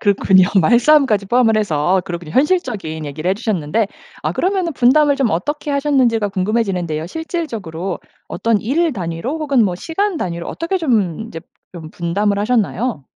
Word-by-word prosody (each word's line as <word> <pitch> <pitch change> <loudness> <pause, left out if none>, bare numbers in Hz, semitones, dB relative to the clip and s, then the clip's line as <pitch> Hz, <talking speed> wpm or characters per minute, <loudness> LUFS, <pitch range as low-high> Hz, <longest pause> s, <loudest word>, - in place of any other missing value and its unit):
그렇군요 190 -2 +4 0.2
말싸움까지 240 - +4
포함을 230 -1 +3
해서 180 -2 +1
그렇군요. 170 -4 -6
현실적인 215 - 0
얘기를 155 +5 -4
해 - - +2
주셨는데 210 -2 -1 0.4
아 - - -1
그러면은 370 -3 0
분담을 285 +3 +4
좀 260 -6 +1
어떻게 295 - -2
하셨는지가 260 -7 +2
궁금해지는데요. 185 -5 -1
실질적으로 215 - -4 0.3
어떤 230 -3 0
일 310 +7 0
단위로 185 - -4
혹은 275 -6 +2
뭐 185 -3 -1
시간 365 - -2
단위로 170 - -4
어떻게 335 +3 -2
좀 220 - 0
이제 165 - -8 0.3
좀 160 -3 -9
분담을 200 +4 -1
하셨나요? 215 - -1
215 Hz, 395 characters per minute, -18 LUFS, 175-280 Hz, 0.4 s, 그렇군요